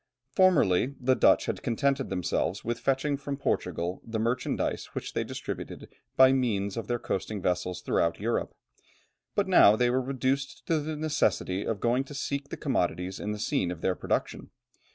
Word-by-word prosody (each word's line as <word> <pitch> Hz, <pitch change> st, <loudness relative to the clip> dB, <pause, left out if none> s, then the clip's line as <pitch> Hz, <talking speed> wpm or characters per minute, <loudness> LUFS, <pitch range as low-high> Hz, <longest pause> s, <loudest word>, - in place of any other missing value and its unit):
Formerly 140 Hz, -, +3 dB
the 130 Hz, +1 st, +3 dB
Dutch -, -, +4 dB
had -, -, -3 dB
contented 135 Hz, +2 st, 0 dB
themselves 95 Hz, +1 st, -1 dB
with 120 Hz, +1 st, -2 dB
fetching 140 Hz, +1 st, 0 dB
from 140 Hz, 0 st, -5 dB
Portugal 90 Hz, -9 st, -2 dB
the 115 Hz, -1 st, -4 dB
merchandise 120 Hz, +3 st, -1 dB
which -, -, -5 dB
they -, -, 0 dB
distributed -, -, -6 dB, 0.3 s
by 130 Hz, 0 st, +8 dB
means 105 Hz, -7 st, 0 dB
of 115 Hz, -, -4 dB
their 120 Hz, -, 0 dB
coasting 105 Hz, -1 st, -3 dB
vessels 90 Hz, -1 st, -1 dB
throughout 85 Hz, 0 st, +1 dB
Europe; 115 Hz, +4 st, -1 dB, 0.8 s
but -, -, +1 dB
now 105 Hz, -, +7 dB
they 120 Hz, +2 st, +2 dB
were 130 Hz, +1 st, +2 dB
reduced 135 Hz, +1 st, -2 dB
to 160 Hz, -2 st, +1 dB
the 155 Hz, +1 st, -4 dB
necessity 145 Hz, -10 st, 0 dB
of 110 Hz, -3 st, -1 dB
going 120 Hz, +3 st, +1 dB
to 145 Hz, -, -10 dB
seek 140 Hz, 0 st, -3 dB
the -, -, -5 dB
commodities 90 Hz, +1 st, -1 dB
in 105 Hz, -, -3 dB
the 105 Hz, -, -3 dB
scene 95 Hz, -3 st, 0 dB
of 90 Hz, -2 st, -6 dB
their 95 Hz, -, +1 dB
production. -, -, -2 dB
120 Hz, 175 wpm, -28 LUFS, 100-135 Hz, 0.8 s, by